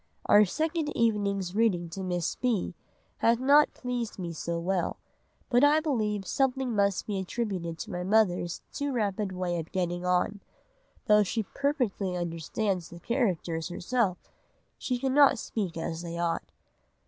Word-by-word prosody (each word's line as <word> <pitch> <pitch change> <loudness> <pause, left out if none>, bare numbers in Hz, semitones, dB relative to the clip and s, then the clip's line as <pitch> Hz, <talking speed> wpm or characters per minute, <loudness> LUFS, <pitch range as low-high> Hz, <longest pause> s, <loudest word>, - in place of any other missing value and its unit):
Our 210 +1 +7
second 315 - -1
evening's 200 -5 +1
reading 200 -6 +2
to 190 +4 -6
Miss 175 -2 -1
B. 240 -7 -1 0.4
had 230 0 +3
not 285 +3 +5
pleased 245 -3 -3
me 175 -3 -4
so 170 +1 -3
well, 180 +1 -1 0.5
but 245 +1 +3
I 295 +2 +6
believe 215 -10 -1
something 265 0 0
must 200 -2 +1
be 200 -2 -2
attributed 185 -4 -3
to 215 - -6
my 180 -1 -3
mother's 185 -4 +1
too 285 -1 -2
rapid 205 -3 -1
way 180 -2 -2
of 165 - -7
getting 175 -1 -1
on: 180 +3 +1 0.6
though 210 0 +6
she 215 +3 0
perfectly 220 - -1
understands 175 +2 -2
the 170 - -10
characters 175 - -1
herself, 185 +1 0 0.6
she 250 - -1
cannot 270 +2 +4
speak 190 -7 -3
as 165 0 -3
they 170 -1 -5
ought. 170 -1 -2
200 Hz, 150 wpm, -28 LUFS, 175-240 Hz, 0.6 s, Our